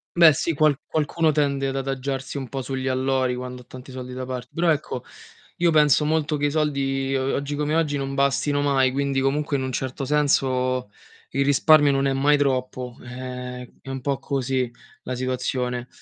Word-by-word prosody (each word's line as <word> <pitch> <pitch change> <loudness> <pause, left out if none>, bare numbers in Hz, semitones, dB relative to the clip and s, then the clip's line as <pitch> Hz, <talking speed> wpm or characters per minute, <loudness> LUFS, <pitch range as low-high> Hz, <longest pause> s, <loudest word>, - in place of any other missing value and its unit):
Beh, 170 -2 +8
sì, 160 +4 -1
qual 150 -1 +3
qualcuno 155 +1 +1
tende 140 -2 +1
ad 135 - -4
adagiarsi 135 0 -3
un 135 -2 -4
po' 135 +2 -4
sugli 130 0 -3
allori 130 0 +1
quando 125 0 -6
ha - - -31
tanti 130 +1 -11
soldi 125 -1 -7
da 130 0 -5
part 125 -1 -5
però 170 0 +1
ecco, 150 -5 -1 0.6
io 170 -1 +3
penso 150 -1 +4
molto 155 0 +1
che 145 - 0
i - - -1
soldi, 135 -3 0
uhm, 135 0 0
uhm, - - 0
oggi 140 +1 -2
come 150 +1 -1
oggi 155 -3 +1
non 135 0 -3
bastino 140 +1 +1
mai, 135 -2 +3
quindi 140 0 0
comunque 140 +1 0
in 130 - -2
un 130 - -3
certo 130 +1 -3
senso 130 -4 +1 0.4
il 140 - +1
risparmio 145 +1 +5
non 135 0 +1
è 135 - +2
mai 145 +2 +3
troppo. 130 -3 -1
Ehm, 125 0 -7
è - - -11
un 135 -1 -4
po' 140 -2 -1
così 130 -2 -1 0.3
la 125 - -4
situazione. 125 -1 -2
135 Hz, 195 wpm, -24 LUFS, 130-145 Hz, 0.6 s, Beh